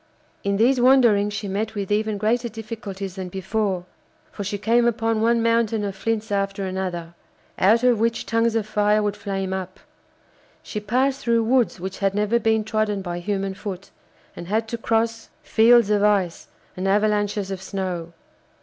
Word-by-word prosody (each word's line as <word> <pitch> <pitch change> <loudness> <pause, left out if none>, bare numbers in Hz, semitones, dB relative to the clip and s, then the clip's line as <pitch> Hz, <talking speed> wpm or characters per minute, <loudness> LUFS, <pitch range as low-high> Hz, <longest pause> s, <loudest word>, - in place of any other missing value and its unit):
In 200 0 0
these 245 +4 +3
wanderings 235 -6 +5
she 205 0 -4
met 215 +3 -3
with 200 -1 -4
even 215 0 0
greater 235 +4 0
difficulties 215 -3 -7
than 185 -1 -5
before, 190 0 -2 0.5
for 205 - -6
she 200 +1 -3
came 235 +4 +2
upon 225 -1 0
one 230 0 +2
mountain 230 -2 +1
of 200 -1 -3
flints 220 +2 -2
after 195 0 -1
another, 180 -3 -4 0.5
out 220 +5 +4
of 245 -3 +4
which 230 +1 0
tongues 230 +2 +1
of 225 -2 0
fire 210 0 +2
would 205 -1 -1
flame 195 -2 -3
up; 185 0 -5 0.8
she 210 - -5
passed 260 +6 0
through 230 -1 +2
woods 240 -3 +2
which 190 +2 -6
had 195 0 0
never 210 +3 +2
been 220 -1 +2
trodden 215 -2 -1
by 175 -1 -4
human 195 +1 -2
foot, 195 -1 -7 0.4
and 170 - -8
had 220 +3 0
to 235 - -3
cross 225 0 -1
fields 230 -1 +5
of 205 -1 +3
ice 195 -5 +1 0.3
and 185 +1 -3
avalanches 205 -1 +1
of 190 -1 -5
snow. 185 -4 -4
210 Hz, 170 wpm, -23 LUFS, 195-225 Hz, 0.8 s, wanderings